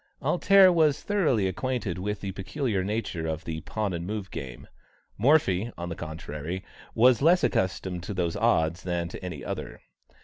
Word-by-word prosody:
"Alter" 195 -2 +5
was 155 -4 +3
thoroughly 150 - +2
acquainted 95 -1 -2
with 105 +2 -3
the 100 - -3
peculiar 100 +1 -2
nature 100 -5 -2
of 80 0 -3
the 80 -1 -4
"pawn 105 0 -3
and 85 +1 -4
move" 105 -3 -4
game; 65 -3 -7 0.5
Morphy, 115 - +3
on 85 0 -5
the 85 - -4
contrary, 80 +2 -6 0.3
was 125 +2 +5
less 175 +4 +5
accustomed 95 -1 0
to 100 +3 -6
those 85 -2 -1
odds 80 +2 +2
than 85 -2 -2
to - - -9
any 85 -7 -6
other. - - -5
95 Hz, 165 wpm, -27 LUFS, 85-120 Hz, 0.5 s, Alter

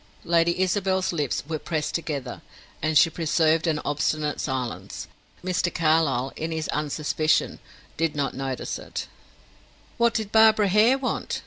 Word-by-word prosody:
Lady 170 +1 +2
Isabel's 190 0 +1
lips 150 -6 -1
were 155 -1 -3
pressed 155 -1 -3
together, 140 -7 -4 0.4
and 155 0 +2
she - - +7
preserved 160 0 +1
an 155 -2 +1
obstinate 150 +1 -1
silence. 130 -3 -4 0.4
Mr. 180 -1 0
Carlyle, 155 -6 +1
in 160 +1 -4
his 160 -1 -2
unsuspicion, 155 +1 0 0.4
did 165 -1 0
not 140 -1 -1
notice 135 -1 -4
it. - - -6 0.9
"What 235 0 +3
did 215 -2 -2
Barbara 220 -2 +5
Hare 220 +7 +5
want?" 270 -1 -3
160 Hz, 135 wpm, -25 LUFS, 150-185 Hz, 0.9 s, she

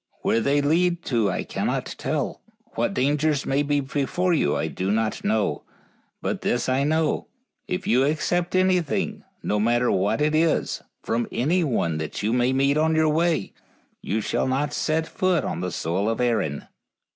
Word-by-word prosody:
Where 115 - +2
they 140 +5 +2
lead 170 +4 +1
to 115 -5 +1
I - - -2
cannot - - -2
tell. - - -2 0.3
What - - -1
dangers 145 +2 +1
may 135 +1 +1
be 145 0 +1
before 145 +6 0
you 110 - +2
I - - -1
do 95 +1 -3
not 110 +1 0
know; 105 -8 0 0.6
but - - -2
this 120 - 0
I 130 +2 +2
know, 155 +1 0 0.4
if 180 +1 -3
you 125 +3 +3
accept 170 +5 0
anything, 185 -4 +1 0.2
no 105 - 0
matter 120 +3 +2
what 95 +7 +1
it 150 +1 +2
is, 160 +1 +1 0.2
from 115 +1 -1
anyone 125 - 0
you 105 +3 -1
may 125 +1 +2
meet 140 +2 +2
on 160 +1 +2
your 160 0 +3
way, 160 - +1 0.5
you 110 +3 -1
shall - - -1
not 145 +3 0
set 160 +1 0
foot 185 0 0
on 85 - -3
the 90 0 -2
soil 90 +7 -1
of 115 - -2
Erin." 110 - 0
140 Hz, 170 wpm, -24 LUFS, 115-160 Hz, 0.6 s, you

